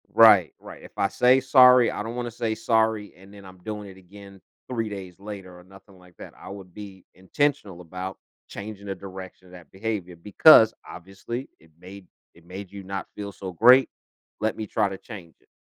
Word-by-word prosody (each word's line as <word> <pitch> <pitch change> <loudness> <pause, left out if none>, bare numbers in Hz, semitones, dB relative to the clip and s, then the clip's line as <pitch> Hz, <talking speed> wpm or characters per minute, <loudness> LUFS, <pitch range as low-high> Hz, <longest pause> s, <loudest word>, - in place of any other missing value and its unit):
Right, 105 -7 +6
right, - - -12
if - - -14
I 100 - +2
say 125 +5 +3
sorry, 125 -2 +6
I - - -5
don't 115 +2 -6
wanna 120 -1 -4
say 115 -1 -3
sorry 110 -2 0
and 95 +2 -17
then 100 -1 -14
I'm 95 0 -14
doing 105 +2 -7
it 95 - -14
again 100 +1 -15 0.3
3 115 -4 -3
days 95 -3 -9
later 95 -3 -10
or - - -16
nothing 95 +1 -18
like 90 -1 -20
that, - - -11
I - - -12
would 95 -2 -11
be 100 -3 -11
intentional 100 -1 -2
about 90 +2 -7 0.3
changing 100 0 -9
the 95 - -4
direction 95 -1 -11
of - - -18
that 85 -5 -14
behavior 95 -3 -5
because 110 - +6
obviously, 95 +8 -8
"It 80 0 -24
made 95 +1 -13 0.3
it 85 0 -22
made 95 +2 -9
you 100 -1 -9
not 95 0 -6
feel 100 -1 -6
so 95 -1 -8
great, 125 +8 +6 0.5
let 110 0 -1
me 110 - -4
try 105 -1 0
to 95 - -7
change 95 -8 -12
it." - - -34
100 Hz, 200 wpm, -24 LUFS, 95-110 Hz, 0.5 s, Right